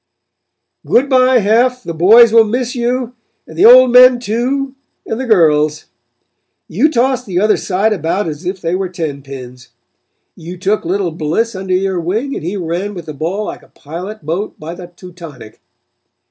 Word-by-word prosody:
Good 270 Hz, +3 st, +1 dB
by 255 Hz, 0 st, +4 dB
Heff! 245 Hz, +5 st, +1 dB
the 170 Hz, -, -5 dB
boys 220 Hz, +8 st, +5 dB
will 230 Hz, -1 st, +7 dB
miss 240 Hz, +3 st, -3 dB
you, 245 Hz, 0 st, -2 dB, 0.3 s
And 160 Hz, -, -13 dB
the 165 Hz, -, +5 dB
old 255 Hz, +1 st, +7 dB
men, 250 Hz, 0 st, +7 dB
too, 250 Hz, +4 st, -2 dB, 0.3 s
and 225 Hz, -, -4 dB
the 260 Hz, -, -4 dB
girls; 155 Hz, -7 st, +2 dB, 0.8 s
You 310 Hz, -, +1 dB
tossed 255 Hz, -2 st, 0 dB
the 180 Hz, -2 st, -1 dB
other 215 Hz, +2 st, +3 dB
side 200 Hz, +3 st, -1 dB
about 175 Hz, +2 st, -2 dB
as 150 Hz, +1 st, -6 dB
if 185 Hz, +2 st, -4 dB
they 165 Hz, 0 st, -2 dB
were 185 Hz, 0 st, -2 dB
ten 155 Hz, -6 st, -5 dB
pins; 125 Hz, -2 st, -11 dB, 0.7 s
You 175 Hz, +3 st, -9 dB
took 200 Hz, +3 st, -1 dB
Little 185 Hz, 0 st, -1 dB
Bliss 165 Hz, +9 st, -2 dB
under 190 Hz, -1 st, -3 dB
your 190 Hz, -1 st, -1 dB
wing 215 Hz, +12 st, -3 dB
and -, -, -6 dB
he 180 Hz, +5 st, -4 dB
ran 180 Hz, +4 st, -4 dB
with 175 Hz, -3 st, -8 dB
the 155 Hz, -, -7 dB
ball 175 Hz, +9 st, -4 dB
like -, -, -7 dB
a -, -, -21 dB
pilot 175 Hz, +5 st, -9 dB
boat 175 Hz, +7 st, -4 dB
by 160 Hz, +2 st, -7 dB
the 175 Hz, 0 st, -10 dB
Teutonic. 170 Hz, -, -13 dB
190 Hz, 175 wpm, -15 LUFS, 165-235 Hz, 0.8 s, will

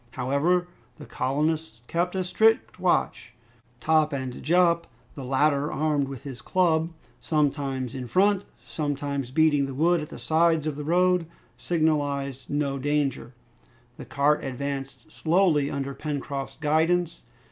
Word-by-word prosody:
However, 145 Hz, +8 st, +1 dB, 0.3 s
the -, -, -11 dB
colonists 150 Hz, -1 st, -2 dB
kept 175 Hz, +6 st, -1 dB
a 185 Hz, -, 0 dB
strict 220 Hz, +2 st, +2 dB
watch. 175 Hz, -8 st, 0 dB, 0.4 s
Top 155 Hz, +2 st, +2 dB
and 130 Hz, -2 st, -4 dB
Jup, 170 Hz, +2 st, +3 dB, 0.3 s
the 140 Hz, -, -8 dB
latter 140 Hz, +2 st, +1 dB
armed 145 Hz, -1 st, 0 dB
with 135 Hz, -3 st, -8 dB
his 135 Hz, -3 st, -8 dB
club, 165 Hz, -3 st, +1 dB, 0.3 s
sometimes 140 Hz, -4 st, -1 dB
in 130 Hz, -2 st, -5 dB
front, 195 Hz, +5 st, +3 dB, 0.2 s
sometimes 140 Hz, -3 st, -3 dB
beating 145 Hz, 0 st, +3 dB
the 135 Hz, -, -6 dB
wood 170 Hz, +3 st, +2 dB
at 150 Hz, -, -7 dB
the -, -, -9 dB
sides 160 Hz, -1 st, +2 dB
of 155 Hz, -2 st, -2 dB
the 150 Hz, -, -5 dB
road, 180 Hz, +1 st, +2 dB, 0.3 s
signalized 140 Hz, -3 st, -1 dB
no 140 Hz, -1 st, -1 dB
danger. 145 Hz, -3 st, -1 dB, 0.6 s
The -, -, -8 dB
cart 145 Hz, +2 st, +1 dB
advanced 135 Hz, +2 st, -5 dB
slowly 160 Hz, -4 st, +2 dB
under 140 Hz, 0 st, -3 dB
Pencroft's 140 Hz, -2 st, -5 dB
guidance. 165 Hz, +2 st, +1 dB
150 Hz, 135 wpm, -26 LUFS, 140-165 Hz, 0.6 s, Jup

